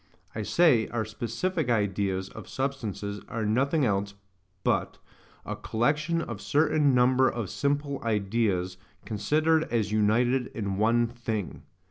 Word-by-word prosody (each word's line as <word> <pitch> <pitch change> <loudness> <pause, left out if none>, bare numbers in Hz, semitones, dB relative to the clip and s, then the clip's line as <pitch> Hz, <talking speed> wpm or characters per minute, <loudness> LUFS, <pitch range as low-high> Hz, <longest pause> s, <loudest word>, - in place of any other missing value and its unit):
I 110 - -3
say, 125 - +3
our 110 -2 -2
SPECIFIC 120 - -2
ideas 100 -3 0
of - - -11
substances 110 -7 -3
are 115 -2 -2
nothing 135 +7 +2
else 100 -2 -1 0.5
but - - 0 0.5
A - - -4
COLLECTION 150 +8 0
OF 115 -7 -6
CERTAIN 150 -2 +3
NUMBER 130 +1 +4
OF 115 -6 -4
SIMPLE 140 0 -1
IDEAS, 100 -4 0 0.3
CONSIDERED 155 +10 +1
AS 110 -3 -1
UNITED 120 +4 +2
IN 100 -3 -2
ONE 115 +3 +3
THING. 115 -4 -4
115 Hz, 125 wpm, -27 LUFS, 105-140 Hz, 0.5 s, NUMBER